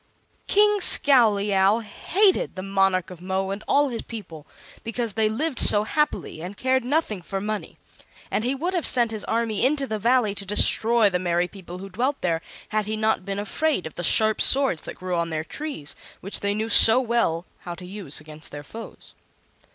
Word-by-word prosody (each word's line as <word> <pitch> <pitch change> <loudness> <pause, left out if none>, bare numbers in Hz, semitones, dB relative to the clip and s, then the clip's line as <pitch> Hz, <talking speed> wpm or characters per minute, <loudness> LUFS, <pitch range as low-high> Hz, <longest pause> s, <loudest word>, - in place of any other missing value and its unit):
King 415 0 +3
Scowleyow 210 - +4
hated 375 - 0
the 185 - -6
Monarch 195 -2 0
of 175 -2 -12
Mo 190 +1 -3
and 200 +2 -6
all 290 0 +2
his 235 -2 -5
people, 170 -9 -10 0.4
because 230 -1 -4
they 220 0 +1
lived 270 +5 -3
so 205 0 +6
happily 300 - -2
and 185 +4 -8
cared 260 0 0
nothing 250 - -2
for 195 +3 -5
money; 210 +1 -5 0.5
and 215 - -1
he 255 +3 -1
would 345 +7 -3
have 350 -3 0
sent 240 -3 +1
his 215 -1 -5
army 225 -2 -1
into 275 +2 +1
the 220 -4 -4
Valley 235 -1 +1
to 200 - -6
destroy 220 +3 +4
the 180 -2 -1
merry 175 0 0
people 180 -2 -11
who 195 +2 -9
dwelt 255 +9 -2
there 165 -2 -1 0.3
had 215 -1 -2
he 215 0 -3
not 220 -3 0
been 195 0 -4
afraid 240 - -2
of 160 - -8
the 175 - -6
sharp 215 +6 +2
swords 270 - +3
that - - -9
grew 185 0 -4
on 170 0 -2
their 155 -1 -3
trees, 275 - -6 0.2
which 195 - -3
they 200 0 -2
knew 220 +1 -3
so 225 +2 +8
well 230 -9 -1
how 175 -1 -8
to 180 - -11
use 185 -6 -6
against 155 0 -9
their 145 0 -8
foes. 225 +9 -12
210 Hz, 195 wpm, -23 LUFS, 185-245 Hz, 0.5 s, so